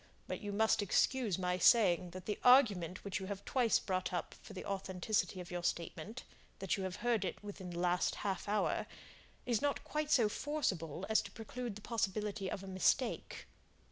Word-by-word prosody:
But - - -4
you 205 -1 -4
must 220 +1 +3
excuse 210 +1 +2
my 180 -1 -1
saying 180 -4 +5
that 180 +1 -9
the 210 - -3
argument 205 - +5
which 200 -1 -2
you 190 - -6
have 200 0 -6
twice 245 -4 +3
brought 185 -2 -2
up 175 -2 -3
for - - -11
the 185 - -7
authenticity 190 0 -1
of 180 -1 -8
your 175 -1 -3
statement, 175 +6 -3 0.3
'that 195 +1 0
you 195 -3 -3
have 185 -1 -4
heard 235 -4 +2
it 190 - -4
within 195 -3 -7
the 170 - -6
last 180 0 +1
half 195 0 -2
hour,' 210 +1 +1 0.6
is 235 -3 +1
not 285 0 0
quite 305 0 -2
so 235 -7 +5
forcible 195 - -2
as 220 - +3
to - - -9
preclude 230 0 -6
the 210 - -9
possibility 210 -3 -2
of 195 - -5
a - - -8
mistake." 190 +7 0
200 Hz, 190 wpm, -35 LUFS, 180-220 Hz, 0.6 s, saying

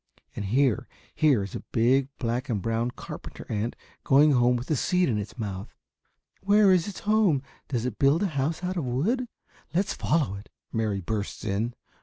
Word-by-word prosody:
And 105 - -3
here, 125 +3 +2 0.3
here 140 -10 +3
is 100 - -7
a - - -3
big 130 +4 +3
black 120 +1 -2
and 110 -4 0
brown 115 +4 0
carpenter - - -9
ant 110 +2 -1 0.3
going 145 +3 +5
home 125 -2 +4
with 125 +5 -4
a - - +4
seed 180 +7 +2
in 110 -3 +1
its 105 +4 -7
mouth." 100 -2 -5 0.7
"Where 200 0 +5
is 180 -1 +3
its 205 - -7
home? 205 -10 +3 0.2
Does 120 -3 -2
it 125 -4 -4
build 145 +7 +4
a - - +2
house 145 +6 -1
out 185 +1 -2
of 170 - -1
wood? 185 - 0 0.5
Let's 190 +3 +1
follow 145 - 0
it," 100 - -12 0.2
Mary 110 -3 0
bursts 105 +3 -4
in. 110 +4 -1
125 Hz, 185 wpm, -27 LUFS, 110-160 Hz, 0.7 s, going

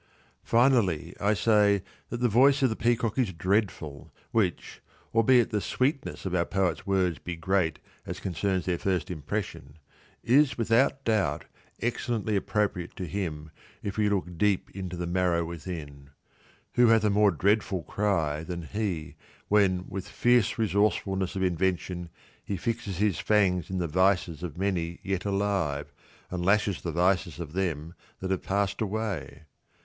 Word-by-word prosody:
Finally, 115 - +2
I 105 +1 +2
say 100 0 +3 0.3
that 120 - -4
the 125 - +4
voice 135 +5 +4
of 130 - +4
the - - -1
peacock 115 0 0
is 120 -7 +1
dreadful, 85 -6 -1 0.2
which 100 -7 -1 0.3
(albeit 115 +1 +4
the 105 - 0
sweetness 130 - -1
of 95 - -2
our 85 -2 +3
poet's 95 -2 -1
words 95 -4 +1
be 85 - -5
great 85 0 0 0.3
as - - -5
concerns 95 0 -1
their 90 -2 -1
first 90 -4 -1
impression) 70 -2 -5 0.5
is 135 +4 +4
without 120 +4 +2
doubt 95 -10 +1 0.4
excellently 115 -3 -1
appropriate 100 -3 -1
to 95 - -4
him 80 -4 -4 0.3
if 100 -2 -3
we 105 -1 +2
look 90 -4 -2
deep 105 -2 +1
into 90 -2 -5
the 90 - -3
marrow 85 -1 +1
within. 80 -5 -7 0.6
Who 120 0 +5
hath 115 -1 +5
a 105 - +3
more 105 0 +5
dreadful 100 0 +1
cry 80 -8 0
than 85 0 -5
he 90 -3 -3 0.3
when 95 -3 +3
with 95 -1 -6
fierce 120 -3 +2
resourcefulness 100 -2 +1
of 95 - -1
invention 90 -1 -1 0.3
he 100 - -3
fixes 115 -5 -3
his 105 -1 +1
fangs 95 -5 +2
in 95 - -2
the 90 -2 -1
vices 90 -1 +1
of 85 -4 -6
many 90 -3 -1
yet 95 -1 -2
alive, 100 -8 -1 0.4
and 90 -1 -2
lashes 100 0 +2
the 85 - -3
vices 90 +1 +1
of 80 -3 -6
them 85 -4 -2 0.3
that 95 0 -3
have 95 - 0
passed 100 +1 -1
away? 105 -11 -3
95 Hz, 155 wpm, -28 LUFS, 85-105 Hz, 0.6 s, Who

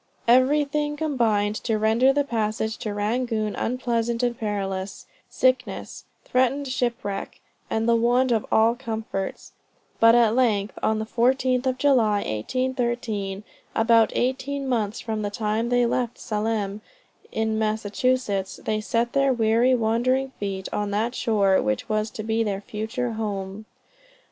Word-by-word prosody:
Everything 295 +4 +3
combined 230 -9 +1
to 225 -2 -1
render 225 +5 +4
the 285 +1 +1
passage 220 -3 -2
to 215 - -4
Rangoon 215 +1 -1
unpleasant 235 -1 -1
and 240 -1 +1
perilous; 195 -3 -4 0.2
sickness, 255 -6 -1 0.2
threatened 260 +3 +1
shipwreck, 235 -6 -3 0.3
and 225 +1 0
the 235 - +4
want 245 +2 +2
of 225 -3 +2
all 225 +1 +4
comforts; 225 -5 -5 0.5
but 230 +1 +7
at 230 -2 +4
length 215 -5 +1
on 220 - +1
the 220 - -3
14th 255 +2 +1
of 255 -1 0
July, 235 -7 +3
1813, 235 - -2 0.3
about 225 0 +4
eighteen 270 +2 -1
months 220 -4 -1
from 220 -1 -3
the 205 - -2
time 215 +2 -1
they 245 0 +3
left 240 0 -1
Salem, 210 -2 -2 0.5
in 220 0 -1
Massachusetts, 215 -1 -1
they 215 0 0
set 235 +2 -1
their 275 -1 +3
'weary, 235 +2 +3
wandering 250 +4 +1
feet' 195 -2 -3
on 205 0 -1
that 220 +4 -1
shore 200 -6 +2
which 105 0 -1
was 215 0 0
to 215 - -7
be 225 +1 0
their 200 -2 -2
future 225 +4 -3
home. 205 -2 -4
225 Hz, 140 wpm, -24 LUFS, 210-250 Hz, 0.5 s, but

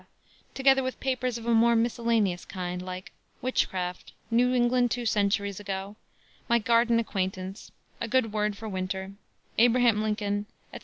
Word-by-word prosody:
together 270 0 +4
with 260 0 -4
papers 255 -2 -1
of 230 - -9
a 235 - +2
more 235 +1 +5
miscellaneous 230 -5 +1
kind, 180 -1 -5
like 185 0 -7 0.3
Witchcraft, 185 -8 -2 0.2
New 245 +2 +3
England 245 0 +3
Two 240 +1 -2
Centuries 200 -2 +1
Ago, 195 0 -5 0.5
My 235 - +5
Garden 235 +1 +3
Acquaintance, 190 -3 -3 0.3
A 230 - -2
Good 230 -3 +1
Word 210 -1 0
for 220 - -7
Winter, 190 -1 -3 0.5
Abraham 240 -2 +4
Lincoln, 210 -1 -1 0.3
etc. - - -6
220 Hz, 145 wpm, -27 LUFS, 195-240 Hz, 0.5 s, more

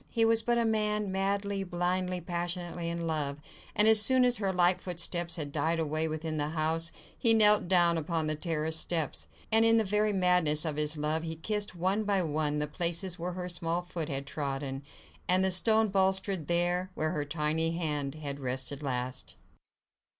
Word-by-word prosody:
He 230 -1 +1
was 225 0 +4
but 240 +1 0
a 235 - +1
man 210 -2 0
madly, 200 +1 -1
blindly, 180 0 -2
passionately 175 0 -3
in 170 0 -4
love, 150 -3 -2 0.4
and 210 - +6
as 220 -1 +8
soon 255 +2 +5
as 245 -1 +3
her 195 -2 -1
light 180 0 +2
footsteps 175 -1 -2
had 150 -4 -5
died 165 +3 0
away 155 0 -1
within 155 0 -4
the 145 0 -1
house, 160 +1 +1 0.2
he 230 -2 +4
knelt 210 -3 +6
down 175 -2 +3
upon 160 0 -2
the 155 - 0
terrace 160 0 -2
steps, 160 -3 -1 0.2
and 225 +1 +5
in 225 0 +5
the 225 - +3
very 210 +1 +1
madness 180 -5 +2
of 155 -2 -2
his 150 +1 0
love 155 +2 -1
he 160 0 -5
kissed 205 +4 -3
one 190 +5 0
by 200 -3 +1
one 150 -1 -1
the 150 - -1
places 175 +3 -1
where 175 +2 -4
her 180 0 -5
small 170 0 -2
foot 170 -3 -5
had 140 -1 -4
trodden, 140 -2 -4 0.5
and 185 +1 +4
the 190 - +2
stone 220 +3 +3
balustrade 190 -3 0
there, 175 +2 0
where 155 0 -1
her 150 -4 -2
tiny 155 +2 -1
hand 150 -4 -3
had 145 -2 -6
rested 130 +2 -4
last. 125 -2 -4
170 Hz, 185 wpm, -29 LUFS, 155-190 Hz, 0.5 s, as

